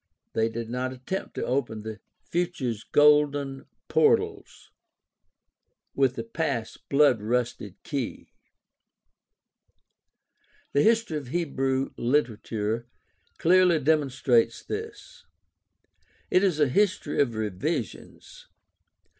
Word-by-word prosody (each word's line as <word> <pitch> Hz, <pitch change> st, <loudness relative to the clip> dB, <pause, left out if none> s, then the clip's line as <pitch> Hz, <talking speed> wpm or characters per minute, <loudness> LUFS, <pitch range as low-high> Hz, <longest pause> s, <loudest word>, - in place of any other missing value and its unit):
They 110 Hz, 0 st, +1 dB
did 115 Hz, 0 st, -5 dB
not 125 Hz, +2 st, -3 dB
attempt 130 Hz, +9 st, -5 dB
to -, -, -2 dB
open 120 Hz, -5 st, -2 dB
"the 110 Hz, -2 st, -7 dB, 0.2 s
future's 160 Hz, -, -2 dB
golden 145 Hz, -2 st, +3 dB, 0.2 s
portals -, -, +1 dB, 1.2 s
with 135 Hz, -2 st, +2 dB
the 115 Hz, -, -4 dB
past's 115 Hz, -2 st, -3 dB
blood 140 Hz, -5 st, +3 dB
rusted 115 Hz, -3 st, -2 dB
key." 135 Hz, -6 st, -5 dB, 2.4 s
The 140 Hz, -, +4 dB
history 225 Hz, -6 st, +2 dB
of 140 Hz, -, -11 dB
Hebrew 135 Hz, -3 st, -1 dB
literature 115 Hz, -3 st, -1 dB, 0.5 s
clearly 180 Hz, -1 st, +4 dB
demonstrates 135 Hz, -6 st, +2 dB
this. 430 Hz, 0 st, -7 dB, 1.1 s
It 185 Hz, -, +4 dB
is 180 Hz, -6 st, +1 dB
a 150 Hz, -, +4 dB
history 185 Hz, 0 st, +1 dB
of 120 Hz, -5 st, 0 dB
revisions. 140 Hz, -, -4 dB
135 Hz, 95 wpm, -26 LUFS, 115-160 Hz, 2.4 s, The